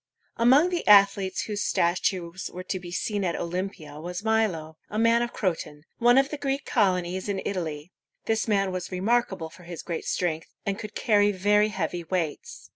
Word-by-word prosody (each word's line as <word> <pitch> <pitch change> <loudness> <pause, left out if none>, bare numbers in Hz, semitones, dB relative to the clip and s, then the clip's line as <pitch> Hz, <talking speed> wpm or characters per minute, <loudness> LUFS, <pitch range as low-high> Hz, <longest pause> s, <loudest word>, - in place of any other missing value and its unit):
Among 265 +9 +5
the 350 -2 -3
athletes 200 -2 +5
whose 210 -1 -3
statues 175 0 0
were 180 - -7
to 185 0 -3
be 175 -1 -9
seen 205 +2 -2
at 175 -2 0
Olympia 170 -4 -4
was 175 +4 -5
Mi´lo, 210 -8 0 0.2
a 210 - -4
man 230 +1 +4
of 240 0 -2
Cro´ton, 165 -6 -3 0.2
one 240 +1 +5
of 270 +1 +4
the 300 - -4
Greek 275 0 -2
colonies 185 -3 0
in 195 -1 -1
Italy. 165 -4 -4 0.3
This 220 0 0
man 195 -3 +2
was 185 0 -5
remarkable 190 -3 0
for 180 - -15
his 175 -1 -8
great 170 -3 -4
strength, 165 -3 -1 0.2
and 200 +1 -2
could 215 -1 -8
carry 205 -2 +3
very 205 +2 +3
heavy 185 -4 -3
weights. 180 - -4
195 Hz, 180 wpm, -26 LUFS, 175-220 Hz, 0.3 s, Among